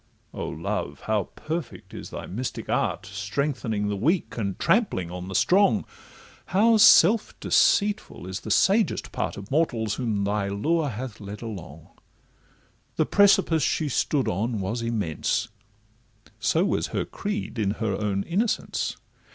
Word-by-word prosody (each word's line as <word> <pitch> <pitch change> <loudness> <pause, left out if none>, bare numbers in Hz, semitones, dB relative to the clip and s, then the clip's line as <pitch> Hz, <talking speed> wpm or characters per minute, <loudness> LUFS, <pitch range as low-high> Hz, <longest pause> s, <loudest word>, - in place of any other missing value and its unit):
O - - -4
Love! 70 0 -4
how 105 -3 0
perfect 160 +1 -6
is - - -8
thy - - -7
mystic 120 +7 -5
art, - - 0
Strengthening 105 +2 -2
the 105 - -1
weak, 160 - 0
and 100 -5 -3
trampling 165 - +1
on 90 0 -6
the 95 - -6
strong, 180 - +3 0.6
How 220 +5 +4
self 220 0 +6
deceitful 205 - +2
is 95 +2 -4
the - - -8
sagest 205 +3 +2
part - - -3
Of 100 +3 -9
mortals 120 -9 +1
whom 110 -5 -1
thy 100 0 0
lure 150 +10 0
hath 120 -1 -6
led 100 +2 -8
along— 85 -8 -8 1.1
The - - +2
precipice 195 -5 +4
she 150 +2 0
stood 140 +1 0
on 110 +5 -1
was 105 +5 -2
immense, 110 -9 -1 0.9
So - - +2
was - - 0
her - - -2
creed 205 - -4
in 100 -1 0
her 110 -3 -1
own 100 -1 -1
innocence. 210 +7 -1
115 Hz, 145 wpm, -25 LUFS, -, 1.1 s, self